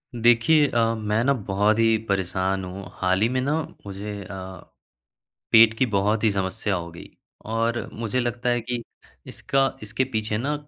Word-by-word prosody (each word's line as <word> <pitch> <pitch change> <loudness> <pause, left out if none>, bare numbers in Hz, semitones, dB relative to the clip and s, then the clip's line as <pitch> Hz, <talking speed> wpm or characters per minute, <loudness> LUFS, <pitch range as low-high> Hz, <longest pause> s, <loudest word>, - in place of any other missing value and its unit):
देखिए 120 +6 +4
अ, 115 -3 +1
मैं 105 +1 0
ना 140 +2 +3
बहुत 105 -2 +1
ही 115 -1 +4
परेशान 95 0 -1
हूँ, 95 +2 -7
हाल 95 +1 0
ही 110 - +4
में 130 - 0
ना 140 +3 -1 0.3
मुझे 100 +1 -6
अ, 95 -1 -8 0.9
पेट 115 0 +7
की 130 - +3
बहुत 105 +1 +1
ही 110 - +4
समस्या 95 +1 -1
हो 85 -2 -4
गई 85 - -11 0.4
और 115 +1 0
मुझे 115 +2 -2
लगता 120 0 -2
है 120 0 +1
कि 120 +1 -4 0.4
इसका 135 -1 0
इसके 110 +5 -1
पीछे 110 -1 -1
ना 140 +6 -1
110 Hz, 170 wpm, -24 LUFS, 95-120 Hz, 0.9 s, पेट